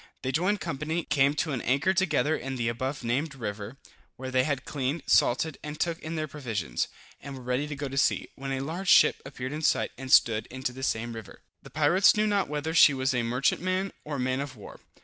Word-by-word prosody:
They 130 - -1
joined 185 +8 +1
company, 160 +1 -3
came 140 0 +2
to 155 - -1
an 130 -4 -2
anchor 140 +9 +2
together 180 -5 +1
in 135 -2 -5
the 120 -2 -1
above 130 +4 -3
named 135 +6 -1
river, 105 0 -6 0.4
where 130 0 -6
they 130 0 +2
had 140 -4 -2
cleaned, 140 +2 -2
salted 140 +5 +2
and 150 0 -7
took 170 -1 -1
in 160 +1 -6
their 155 -1 -2
provisions, 110 - -3 0.3
and 140 -1 -8
were 130 - -10
ready 125 +4 -1
to 150 - -5
go 140 +1 -4
to 135 +1 -2
sea, - - +1
when 135 0 -6
a 135 0 -1
large 170 +7 -3
ship - - +6
appeared 130 -1 -6
in 155 - -4
sight, - - +1
and 130 -1 -6
stood 110 -4 +5
into 130 -1 -4
the 130 - -9
same 120 -2 -1
river. 115 -3 -10 0.2
The - - -13
pirates 155 +6 +4
knew 215 - +3
not 205 -5 +1
whether 150 +2 -3
she 145 -4 +7
was 130 0 0
a 125 - +1
merchantman 180 +11 0
or 150 -1 -4
man 130 0 -1
of 140 -2 -5
war. 105 - -12
135 Hz, 225 wpm, -28 LUFS, 130-155 Hz, 0.4 s, she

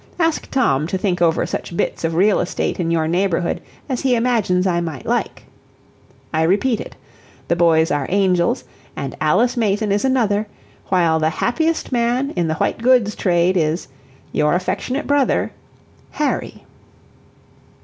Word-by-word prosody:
Ask 330 -2 0
Tom 155 - +1
to 190 - -2
think 185 -2 -1
over 165 -1 +2
such 170 - -5
bits - - -2
of 165 0 -1
real 200 +4 +3
estate 175 - -2
in 170 -2 0
your 165 -1 +1
neighborhood 175 0 0 0.3
as 260 -4 -2
he 260 -2 +2
imagines 225 -7 +1
I 175 -2 +1
might 160 -6 -5
like. - - -2 0.9
"I 160 - +1
repeat 205 +8 +2
it, - - -10 0.5
the 170 - +3
boys 165 -2 +3
are 145 -2 0
angels, 180 -6 +1 0.3
and 135 - -5
Alice 225 +11 +2
Mayton 210 -2 0
is 205 +1 +1
another, 220 -6 +1 0.4
while 170 -4 +2
the 155 0 +2
happiest 315 - -1
man 245 +3 0
in 175 -2 -1
the 155 - -1
white - - -1
goods 240 -4 +3
trade 175 0 +2
is 160 -3 0 0.4
"Your 150 +2 +2
affectionate 250 +9 -2
brother 285 -2 +1 0.6
"HARRY." 300 - -2
185 Hz, 150 wpm, -19 LUFS, 165-240 Hz, 0.9 s, real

